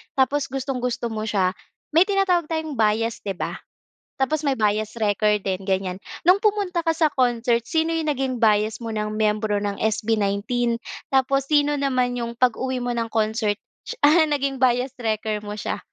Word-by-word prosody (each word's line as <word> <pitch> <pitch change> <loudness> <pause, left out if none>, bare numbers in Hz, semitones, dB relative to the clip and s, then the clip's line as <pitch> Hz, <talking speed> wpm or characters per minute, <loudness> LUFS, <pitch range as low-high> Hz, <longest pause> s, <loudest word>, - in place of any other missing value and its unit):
tapos 275 +2 +2
gustong-gusto 255 -3 -3
mo 215 -1 -3
siya 190 -4 +1 0.4
may 330 +4 +5
tinatawag 390 -4 +2
tayong 315 -3 -3
bias 225 +1 +1
di 195 -2 -2
ba? - - -3 0.7
Tapos 290 +3 0
may 275 -4 0
bias 215 +1 0
wrecker 210 0 +2
din 190 -1 -3
ganiyan, 190 -1 -1 0.3
nung 380 +4 +5
pumunta 400 -5 +1
ka 330 - +1
sa 325 0 +2
concert 240 -2 +2
sino 325 +3 0
yung 315 -2 0
naging 265 -2 -1
bias 215 +1 +2
mo 230 - -4
ng 215 -1 -3
miyembro 215 -1 +1
ng 200 -1 -3
SB19 220 +2 0 0.4
tapos 270 +1 +2
sino 290 0 +2
naman 255 -3 0
yung 235 0 -4
pag-uwi 255 +1 0
mo 245 - -2
ng 235 -1 -1
concert, 220 -1 0 0.5
ah, 315 +2 +6
naging 275 -2 -1
biased 250 0 +1
wrecker 220 -2 -1
mo 210 0 -7
siya? 210 - -3
240 Hz, 165 wpm, -23 LUFS, 215-280 Hz, 0.7 s, ah